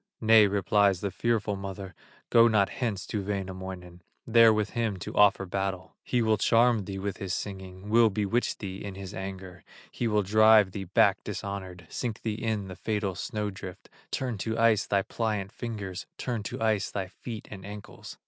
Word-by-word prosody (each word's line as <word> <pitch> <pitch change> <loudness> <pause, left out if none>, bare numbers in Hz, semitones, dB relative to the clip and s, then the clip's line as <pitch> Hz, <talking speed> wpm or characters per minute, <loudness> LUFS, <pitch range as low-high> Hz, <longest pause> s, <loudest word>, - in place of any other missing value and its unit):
"Nay," 110 -1 +6
replies 100 -1 +2
the 100 - -2
fearful 110 0 0
mother, 95 -1 -7 0.4
"Go 115 0 +7
not 105 -3 +3
hence 110 -7 -3
to 105 - -3
Wainamoinen, 95 -3 -5 0.2
There 115 -1 +7
with 105 -1 0
him 115 -5 -1
to 90 - -7
offer 100 -1 +4
battle; 95 0 -3
He 125 -2 0
will 110 -1 +3
charm 115 -3 +3
thee 95 0 -5
with 100 +1 -3
his 95 -2 -3
singing 95 -1 -7
Will 115 +1 +5
bewitch 105 +4 0
thee 95 -1 -6
in 100 -2 -6
his 95 -1 -8
anger, 95 -2 -7 0.3
He 120 - -2
will 105 -2 +2
drive 110 0 +6
thee 95 0 -5
back 100 +1 +3
dishonored, 95 -3 -6
Sink 120 -4 -4
thee 110 - -1
in 110 -2 -2
the 95 - -8
fatal 105 0 -2
snow 105 +3 -3
drift, 95 -2 -10 0.2
Turn 125 -5 -3
to 110 +3 -2
ice 115 -2 +3
thy 100 -1 +2
pliant 105 -2 -2
fingers, 105 -6 -6
Turn 120 -4 -3
to - - -6
ice 110 -3 +1
thy 95 -2 -3
feet 110 +3 -8
and 95 -2 -8
ankles." 100 +1 -10
100 Hz, 180 wpm, -28 LUFS, 95-110 Hz, 0.4 s, Go